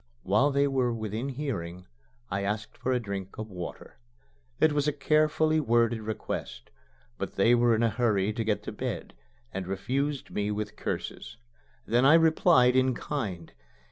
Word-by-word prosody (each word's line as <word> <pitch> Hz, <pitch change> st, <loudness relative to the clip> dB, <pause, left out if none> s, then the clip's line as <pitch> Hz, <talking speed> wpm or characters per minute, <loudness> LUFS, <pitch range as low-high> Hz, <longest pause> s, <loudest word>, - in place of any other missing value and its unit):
While 105 Hz, +9 st, +3 dB
they 140 Hz, 0 st, +2 dB
were 130 Hz, -3 st, +1 dB
within 110 Hz, +3 st, -3 dB
hearing, 95 Hz, -, -4 dB, 0.5 s
I 100 Hz, -, -1 dB
asked 105 Hz, +2 st, -3 dB
for 130 Hz, -, -2 dB
a 125 Hz, -, +2 dB
drink 100 Hz, -4 st, -6 dB
of 110 Hz, 0 st, -6 dB
water. 90 Hz, -2 st, -8 dB, 0.6 s
It 155 Hz, -, +5 dB
was 145 Hz, 0 st, +1 dB
a -, -, +3 dB
carefully 155 Hz, +2 st, +2 dB
worded 115 Hz, -4 st, +2 dB
request. 105 Hz, -, -5 dB, 0.5 s
But -, -, -4 dB
they 115 Hz, +5 st, +4 dB
were 120 Hz, -1 st, +4 dB
in 110 Hz, -, +1 dB
a 115 Hz, -, +4 dB
hurry 105 Hz, -3 st, +1 dB
to 115 Hz, -, -2 dB
get 110 Hz, -1 st, -1 dB
to -, -, -5 dB
bed, -, -, -5 dB, 0.4 s
and 95 Hz, -1 st, -4 dB
refused 135 Hz, +8 st, -2 dB
me 105 Hz, 0 st, -1 dB
with 105 Hz, 0 st, -3 dB
curses. -, -, -5 dB, 0.5 s
Then 120 Hz, +3 st, +2 dB
I 140 Hz, +4 st, +7 dB
replied 160 Hz, -5 st, +5 dB
in 130 Hz, -1 st, +3 dB
kind. 100 Hz, -, -4 dB
115 Hz, 165 wpm, -28 LUFS, 105-140 Hz, 0.6 s, I